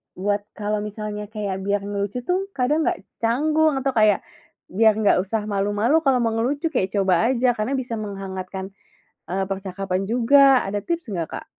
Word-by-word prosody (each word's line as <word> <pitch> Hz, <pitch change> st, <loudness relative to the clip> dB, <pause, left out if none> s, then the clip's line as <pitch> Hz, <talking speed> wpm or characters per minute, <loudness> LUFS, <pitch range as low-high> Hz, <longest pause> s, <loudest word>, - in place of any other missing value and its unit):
buat 205 Hz, +2 st, 0 dB, 0.2 s
kalau 210 Hz, 0 st, -2 dB
misalnya 210 Hz, 0 st, -5 dB
kayak 205 Hz, -3 st, -4 dB
biar 200 Hz, +1 st, -1 dB
ngelucu 205 Hz, +4 st, -3 dB
tuh 370 Hz, +6 st, -1 dB
kadang 290 Hz, +5 st, +1 dB
nggak 190 Hz, -, -1 dB, 0.2 s
canggung 305 Hz, +6 st, +2 dB
atau 270 Hz, 0 st, 0 dB
kayak, 215 Hz, -4 st, +3 dB, 0.5 s
biar 220 Hz, +2 st, +4 dB
nggak 210 Hz, -4 st, +3 dB
usah 205 Hz, +3 st, -2 dB
malu-malu 205 Hz, +7 st, +1 dB
kalau 255 Hz, -3 st, +3 dB
mau 230 Hz, -, +1 dB
ngelucu 275 Hz, +8 st, -1 dB
kayak 190 Hz, -, -1 dB
coba 190 Hz, +1 st, +3 dB
aja, 250 Hz, 0 st, +3 dB
karena 215 Hz, +6 st, -1 dB
bisa 240 Hz, -4 st, -3 dB
menghangatkan, 190 Hz, -2 st, -6 dB, 0.6 s
eee, 190 Hz, +2 st, -1 dB
percakapan 190 Hz, -1 st, -3 dB
juga, 260 Hz, +3 st, +5 dB
ada 205 Hz, +1 st, -2 dB
tips 335 Hz, -7 st, -3 dB
nggak, 170 Hz, -4 st, -3 dB
Kak? -, -, -7 dB
210 Hz, 165 wpm, -23 LUFS, 195-250 Hz, 0.6 s, juga